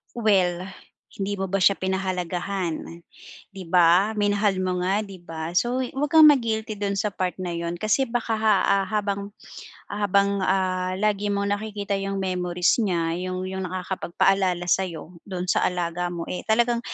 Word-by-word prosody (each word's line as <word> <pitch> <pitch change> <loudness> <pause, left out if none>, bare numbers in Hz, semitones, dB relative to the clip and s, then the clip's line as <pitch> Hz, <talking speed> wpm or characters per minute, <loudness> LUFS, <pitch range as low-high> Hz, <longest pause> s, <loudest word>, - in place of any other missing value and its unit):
Well, 190 -5 +1 0.5
hindi 200 0 -2
mo 195 -1 -3
ba 195 - +1
siya 200 - +6
pinahalagahan, 185 -2 -3 0.5
di 195 -3 -9
ba, 180 +4 +4
minahal 205 -1 +1
mo 185 -1 -1
nga, 195 +3 +1
'di 200 -3 -9
ba? 165 -1 -6
So, 245 +4 +1
'wag 270 +3 -2
kang 315 -1 +9
ma-guilty 225 -6 0
dun 200 -1 -1
sa 210 +1 0
part 185 -2 -2
na 180 - -3
yun 170 0 -3
kasi 215 +5 +2
baka 230 -2 -2
ha 200 -2 +3
habang 200 -1 -2 0.6
habang, 200 -1 +1
ah, 185 -1 0
lagi 205 0 +1
mong 200 0 -1
nakikita 205 -1 -3
yung 195 0 -3
memories 180 +1 +1
niya 170 -6 0
yung 185 0 -3
yung 190 0 -4
nakakapagpaalala 185 0 0
sa'yo 175 -2 -2
dun 185 -2 -4
sa - - +2
alaga 175 0 -2
mo, 175 -1 -5
eh 180 - -4
talagang 235 +2 +2
195 Hz, 155 wpm, -24 LUFS, 180-205 Hz, 0.6 s, kang